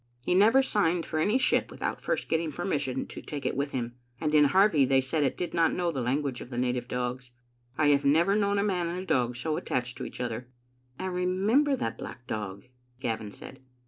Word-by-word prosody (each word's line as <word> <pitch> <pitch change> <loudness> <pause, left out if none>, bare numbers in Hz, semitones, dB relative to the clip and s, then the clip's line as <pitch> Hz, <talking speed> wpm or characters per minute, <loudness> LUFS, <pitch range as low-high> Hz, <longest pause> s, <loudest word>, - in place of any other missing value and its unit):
He - - +2
never 225 +8 +6
signed 175 -8 +1
for 155 - -2
any 205 +10 +3
ship 265 - +2
without - - -4
first - - -1
getting 160 -1 0
permission 140 -5 -2
to - - -9
take 145 -2 -6
it - - 0
with 140 +2 -1
him, 120 -3 -3 0.3
and 155 -1 -1
in 150 -1 +6
Harvie 185 -1 +4
they 135 0 +4
said 140 +4 0
it 135 - 0
did 175 - -3
not 165 -1 +3
know 175 -1 0
the 135 -5 -3
language 135 +1 -1
of - - -9
the 120 - -6
native 125 0 -1
dogs. 125 0 -3 0.5
I 150 -1 +4
have 140 -1 +4
never 165 +8 +4
known 200 -1 +2
a 200 - +2
man 180 -4 0
and 180 +2 -4
dog 125 -7 +1
so 155 +5 -2
attached 125 0 -3
to - - -4
each - - -8
other." 120 0 -3 0.5
"I 185 - -4
remember 190 +10 +2
that 115 - -3
black 125 - -8
dog," 100 -3 -5 0.4
Gavin 110 -4 -3
said. - - -11
150 Hz, 215 wpm, -28 LUFS, 125-180 Hz, 0.5 s, never